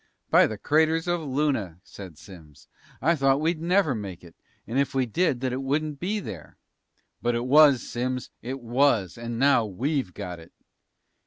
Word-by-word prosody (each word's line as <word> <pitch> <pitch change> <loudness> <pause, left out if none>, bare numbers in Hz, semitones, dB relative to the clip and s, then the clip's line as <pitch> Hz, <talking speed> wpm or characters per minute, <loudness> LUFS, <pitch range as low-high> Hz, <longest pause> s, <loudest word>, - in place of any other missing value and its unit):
"By - - +6
the 110 - -6
craters 160 - +1
of 175 -1 0
Luna," 130 - -1
said 95 -7 -11
Simms, 80 -7 -15 0.4
"I 170 +4 +3
thought 135 -1 +2
we'd 160 +1 -1
never 175 -3 +2
make 100 -6 -7
it! 85 -1 -15 0.3
And 120 +5 -2
if 140 -1 -1
we 130 -1 +2
did, 130 0 0
that 130 -2 -1
it 130 - -3
wouldn't 145 +2 -2
be 205 +6 -2
there!" 90 - -9 0.6
"But 120 +2 0
it 120 +1 -2
was, 140 -1 +5
Simms! 125 +1 -3
It 130 +3 -5
was! 120 -5 +1
And 115 0 -6
now 135 -2 +4
we've 115 - -2
got 90 -4 -6
it!" 80 - -16
130 Hz, 175 wpm, -25 LUFS, 105-150 Hz, 0.6 s, By